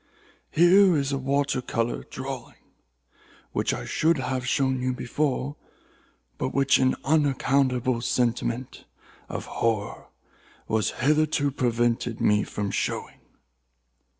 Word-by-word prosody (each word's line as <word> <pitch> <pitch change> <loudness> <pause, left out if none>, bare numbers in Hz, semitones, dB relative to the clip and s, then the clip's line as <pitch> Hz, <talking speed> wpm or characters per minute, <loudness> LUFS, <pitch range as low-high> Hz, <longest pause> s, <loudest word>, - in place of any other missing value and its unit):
Here 180 +1 +5
is 140 -1 -1
a 135 - -1
watercolor 135 -4 -1
drawing, 130 -2 -7 0.9
which - - 0
I - - -4
should 160 - +2
have 130 -1 -3
shown 130 +1 +1
you 130 0 0
before, 140 +2 -2 0.8
but - - -2
which 140 0 +4
an 130 0 +3
unaccountable 135 -4 +1
sentiment 120 +1 -1 0.4
of - - -5
horror 110 -3 -2 0.6
has 110 -1 +1
hitherto 150 0 +1
prevented 120 -3 0
me 105 0 +3
from 100 -1 -4
showing." - - -3
130 Hz, 105 wpm, -26 LUFS, 120-140 Hz, 0.9 s, Here